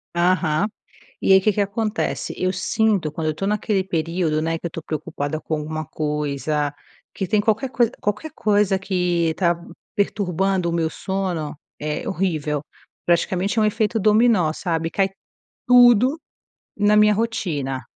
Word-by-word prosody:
Aham, 175 Hz, 0 st, +2 dB, 0.6 s
e -, -, +4 dB
aí 190 Hz, -, +8 dB
que 215 Hz, +2 st, +2 dB
que 205 Hz, -, -1 dB
acontece, 210 Hz, +2 st, -2 dB
eu 185 Hz, 0 st, 0 dB
sinto 190 Hz, -2 st, +1 dB
quando 155 Hz, +1 st, -3 dB
eu -, -, +3 dB
estou 195 Hz, +6 st, -3 dB
naquele 210 Hz, -1 st, 0 dB
período, 165 Hz, -3 st, -1 dB
né, 165 Hz, +1 st, -1 dB
que 170 Hz, -, -6 dB
eu -, -, -1 dB
estou 165 Hz, 0 st, -8 dB
preocupada 155 Hz, -1 st, -4 dB
com 160 Hz, -, -3 dB
alguma 155 Hz, +1 st, -4 dB
coisa, 150 Hz, -1 st, -2 dB, 0.4 s
que 195 Hz, -, -2 dB
tem 205 Hz, +3 st, +2 dB
qualquer 220 Hz, +5 st, 0 dB
coisa 240 Hz, -1 st, +2 dB
qualquer 210 Hz, +10 st, -2 dB
coisa 205 Hz, -2 st, +2 dB
que 180 Hz, -4 st, 0 dB
tá 175 Hz, -2 st, +2 dB, 0.4 s
perturbando 195 Hz, -2 st, 0 dB
o -, -, -1 dB
meu 165 Hz, -1 st, 0 dB
sono, 185 Hz, -7 st, -3 dB, 0.2 s
é 150 Hz, 0 st, -3 dB
horrível, 155 Hz, -6 st, -1 dB, 0.4 s
praticamente 185 Hz, +4 st, +1 dB
é -, -, +4 dB
um -, -, +3 dB
efeito 215 Hz, +1 st, +1 dB
dominó, 210 Hz, -5 st, +4 dB
sabe, 165 Hz, -1 st, -2 dB
cai 195 Hz, +2 st, +1 dB, 0.6 s
tudo 245 Hz, +3 st, +6 dB, 0.6 s
na 205 Hz, +1 st, +3 dB
minha 210 Hz, 0 st, +6 dB
rotina, 155 Hz, -, -2 dB
185 Hz, 155 wpm, -22 LUFS, 160-210 Hz, 0.6 s, aí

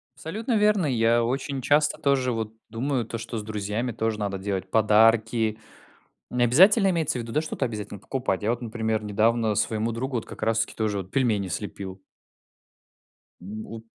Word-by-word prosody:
Абсолютно 220 Hz, +8 st, -2 dB
верно, 210 Hz, -4 st, +3 dB
я 115 Hz, -2 st, +3 dB
очень 135 Hz, +2 st, -2 dB
часто 150 Hz, +3 st, +2 dB
тоже 135 Hz, -3 st, +2 dB
вот 110 Hz, -1 st, -3 dB, 0.2 s
думаю, 125 Hz, +1 st, -1 dB
то 115 Hz, -, -5 dB
что 115 Hz, 0 st, -5 dB
с 105 Hz, -, -4 dB
друзьями 105 Hz, +3 st, -3 dB
тоже 110 Hz, -1 st, -2 dB
надо 100 Hz, -2 st, -2 dB
делать 95 Hz, -1 st, -3 dB
подарки, 110 Hz, +1 st, +3 dB, 0.7 s
не 125 Hz, 0 st, +2 dB
обязательно 190 Hz, -, +6 dB
имеется 160 Hz, -7 st, 0 dB
в -, -, -3 dB
виду, 115 Hz, -, -8 dB
да, 150 Hz, -, +2 dB
что-то 155 Hz, -3 st, -3 dB
обязательно 105 Hz, -4 st, -5 dB
покупать, 125 Hz, -5 st, -2 dB
я 110 Hz, -, +1 dB
вот, 120 Hz, +1 st, -2 dB
например, 110 Hz, -1 st, -2 dB
недавно 110 Hz, +1 st, +2 dB
своему 110 Hz, +2 st, 0 dB
другу 130 Hz, +2 st, -3 dB
вот 115 Hz, -, -3 dB
как -, -, -11 dB
раз 115 Hz, 0 st, +2 dB
таки 115 Hz, -, -2 dB
тоже 105 Hz, -2 st, -1 dB
вот 95 Hz, 0 st, -6 dB
пельмени 110 Hz, -8 st, +1 dB
слепил. 95 Hz, +1 st, -5 dB, 1.4 s
Ну 105 Hz, +4 st, -7 dB
вот 115 Hz, 0 st, -8 dB
115 Hz, 175 wpm, -25 LUFS, 105-130 Hz, 1.4 s, обязательно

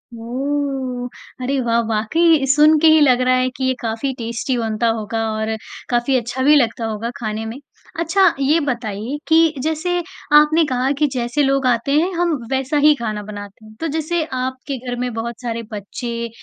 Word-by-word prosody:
ओह! 260 Hz, +1 st, -3 dB, 0.3 s
अरे 270 Hz, +2 st, 0 dB
वाह! 235 Hz, -1 st, +1 dB
वाक़ई 275 Hz, +8 st, +2 dB
सुनके 305 Hz, +3 st, +5 dB
ही 315 Hz, 0 st, +7 dB
लग 255 Hz, -3 st, +4 dB
रहा 255 Hz, 0 st, +3 dB
है 255 Hz, 0 st, +1 dB
कि 265 Hz, -, -4 dB
ये 260 Hz, -, +2 dB
काफ़ी 230 Hz, +4 st, -2 dB
टेस्टी 235 Hz, +2 st, -2 dB
बनता 225 Hz, 0 st, -1 dB
होगा 220 Hz, +1 st, -3 dB
और 220 Hz, 0 st, -2 dB, 0.3 s
काफ़ी 240 Hz, +2 st, +1 dB
अच्छा 245 Hz, +2 st, -3 dB
भी 295 Hz, +3 st, +6 dB
लगता 235 Hz, -4 st, +1 dB
होगा 220 Hz, +1 st, -3 dB
खाने 220 Hz, -1 st, -4 dB
में। 225 Hz, +3 st, -6 dB, 0.4 s
अच्छा 340 Hz, +4 st, +3 dB
ये 290 Hz, +4 st, +3 dB
बताइए 235 Hz, -3 st, -3 dB
कि 325 Hz, 0 st, +4 dB
जैसे 320 Hz, +3 st, -1 dB, 0.4 s
आपने 305 Hz, +2 st, +5 dB
कहा 255 Hz, -1 st, 0 dB
कि 300 Hz, -, +3 dB
जैसे 250 Hz, +3 st, 0 dB
लोग 275 Hz, -1 st, +1 dB
आते 240 Hz, +2 st, +1 dB
हैं, 350 Hz, +4 st, 0 dB
हम 345 Hz, -2 st, +1 dB, 0.2 s
वैसा 265 Hz, +2 st, 0 dB
ही 300 Hz, -, +8 dB
खाना 215 Hz, -5 st, -4 dB
बनाते 205 Hz, 0 st, -10 dB
हैं। 215 Hz, -, -14 dB
तो 330 Hz, -, -2 dB
जैसे 320 Hz, +1 st, -1 dB
आपके 260 Hz, +2 st, -3 dB
घर 245 Hz, -, -2 dB
में 250 Hz, -1 st, -2 dB
बहुत 225 Hz, +1 st, -5 dB
सारे 230 Hz, -2 st, -3 dB
बच्चे 235 Hz, +3 st, -5 dB
255 Hz, 180 wpm, -19 LUFS, 230-295 Hz, 0.4 s, ही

